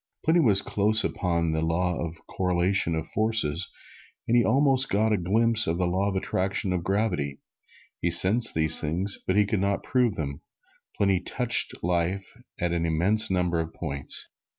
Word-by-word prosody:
Pliny 165 +2 +3
was 105 - +4
close 105 +1 +1
upon 85 -3 -1
the 80 0 -1
Law 85 +2 -1
of 85 0 -6
the - - -23
Correlation 90 -1 -1
of 80 0 -4
Forces, 110 -7 0 0.6
and 115 - +1
he 120 - +4
almost 135 +2 +2
got 110 +2 +1
a - - +3
glimpse 110 +5 +2
of 80 +1 -1
the 90 - 0
Law 95 +3 -1
of 95 - -5
Attraction 95 0 -2
or 90 - -1
Gravitation. 90 -7 -2 0.6
He 85 - 0
sensed 100 +7 +4
these 80 0 +4
things, 90 +6 0
but 95 - 0
could 105 -2 -1
not 100 0 -1
prove 125 -5 0
them. 70 -3 -5 0.6
Pliny 100 -2 +1
touched 120 +5 +1
life 90 +3 -2 0.3
at 85 -1 -1
an 85 -1 -1
immense 90 +7 +1
number 90 -2 0
of 80 0 -5
points. 70 -4 -2
95 Hz, 175 wpm, -25 LUFS, 85-110 Hz, 0.6 s, was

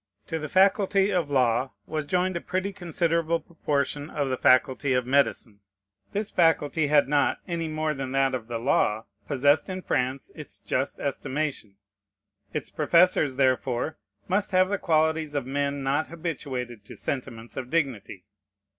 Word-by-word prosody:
To 165 - -3
the 150 -1 -5
faculty 195 +1 +3
of 175 -6 0
law 130 -1 +1
was 155 -2 -4
joined 185 +1 +1
a 170 - -2
pretty 185 +2 -2
considerable 170 -2 0
proportion 145 -3 -2
of 145 -2 -2
the - - +1
faculty 130 +1 +3
of 125 -1 +1
medicine. 130 -5 +1 0.5
This 210 +1 -2
faculty 160 -2 +2
had 145 -2 +4
not, 145 0 +2
any 170 -2 -2
more 155 0 -1
than 135 -2 -5
that 135 -1 +2
of 120 -3 -4
the 120 -1 -3
law, 115 -2 +1 0.2
possessed 145 +5 +2
in 185 0 -5
France 130 +2 -1
its 150 - -9
just 135 +2 -2
estimation. 140 -6 -3 0.8
Its 150 - -4
professors, 155 -3 +3
therefore, 130 -4 0 0.3
must 205 +1 0
have 185 0 +4
the 205 -1 -1
qualities 160 -2 +1
of 140 -3 -1
men 140 +1 -2
not 140 +3 0
habituated 130 - -5
to - - -11
sentiments 115 -4 -5
of 130 -2 -5
dignity. 130 - -2
145 Hz, 155 wpm, -26 LUFS, 130-165 Hz, 0.8 s, had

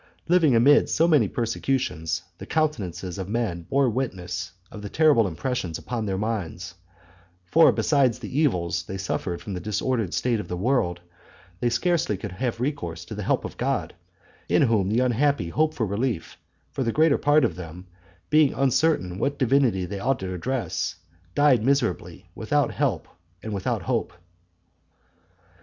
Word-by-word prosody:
Living 165 -7 +4
amid 140 +6 +5
so 165 - +3
many 150 -10 +4
persecutions, 115 - -2 0.2
the - - -7
countenances 95 - -2
of 95 0 -5
men 105 -6 -1
bore 140 -1 +3
witness 105 -9 -3 0.2
of 105 - -9
the 105 - -6
terrible 150 -8 +4
impressions 90 -1 -3
upon 115 -3 -4
their 95 -1 -1
minds; 105 -6 -3 0.7
for 165 - +6
besides 135 -5 +2
the 125 +4 -4
evils 90 - +1
they 95 - -5
suffered 90 -2 -3
from 95 +4 -7
the 90 - -3
disordered 105 +1 -1
state 120 0 0
of - - -6
the 90 - -4
world, 90 -5 0 0.6
they 120 - +1
scarcely 155 - +1
could 100 +1 -6
have 115 +4 -3
recourse 125 - -3
to - - -8
the - - -5
help - - 0
of - - -8
God, - - -1 0.6
in 90 - +4
whom 110 -7 +2
the 115 +4 +2
unhappy 130 -5 +1
hope 155 - +1
for 115 - 0
relief; 105 -2 -2 0.4
for 85 - -4
the 115 - 0
greater 155 +2 +3
part 145 +1 +4
of - - -2
them, 90 +1 -9 0.5
being 150 -2 +4
uncertain 130 - +1
what 140 +5 -1
divinity 125 -8 +2
they 100 +2 -5
ought 135 +6 +1
to 95 -1 -5
address, 110 0 -2 0.4
died 140 -6 +4
miserably, 135 -2 -1
without - - 0
help - - -1 0.4
and 110 - -4
without 100 - -2
hope. - - -1
115 Hz, 160 wpm, -25 LUFS, 95-135 Hz, 0.7 s, for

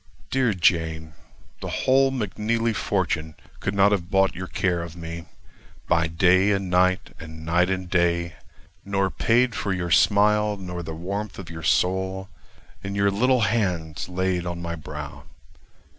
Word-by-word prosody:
Dear 125 -6 +2
Jane! 80 -3 +1 0.5
the - - -5
whole 135 +1 +3
McNeely 115 -1 -1
fortune 85 -7 -1 0.2
Could 100 - -2
not 100 +1 +5
have 90 -4 -1
bought 95 0 +3
your 90 +1 -6
care 90 -2 0
of 85 -1 -8
me, 85 0 -7 0.6
By 80 -1 +2
day 90 +4 +3
and 95 -2 -2
night, 90 +1 +2
and 80 0 -10
night 90 +3 +2
and 95 -1 -2
day; 85 -1 +1 0.5
Nor 100 -1 0
paid 120 +2 +2
for 100 - -2
your 90 -2 -2
smile, 105 +2 +4
nor 90 -2 -6
the 80 -1 -6
warmth 100 +5 -5
of 85 -4 -8
your 80 -1 -7
soul, 95 +3 0 0.5
In 100 0 -4
your 100 0 +2
little 125 +5 +2
hands 90 -8 -1
laid 90 -1 -1
on 85 0 -4
my 85 -1 -4
brow. 75 -2 -8
95 Hz, 155 wpm, -24 LUFS, 85-100 Hz, 0.6 s, not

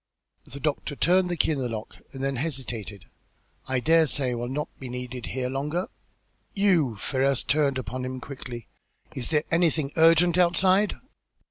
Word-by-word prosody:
The 140 - -9
doctor 145 0 -2
turned 180 +5 +3
the 175 - -2
key - - +2
in 150 - -1
the 125 -2 -2
lock 110 -1 -6
and 135 0 -7
then 135 -1 -1
hesitated. 120 - -4 0.6
"I 130 -1 0
dare 160 +4 +4
say 135 -2 +2
I - - -1
will 120 0 -3
not 150 +3 -3
be 130 - -7
needed 125 0 -6
here 130 -1 -2
longer?" 150 +7 -2 0.7
"You!" 180 - +3
Ferrars 135 +5 0
turned 145 -3 +2
upon 130 0 -4
him 130 0 -4
quickly. 125 -3 -8 0.5
"Is 125 -3 -3
there 150 -2 +1
anything 165 -4 +2
urgent 165 +2 +5
outside?" 185 +3 +3
140 Hz, 165 wpm, -26 LUFS, 125-165 Hz, 0.7 s, urgent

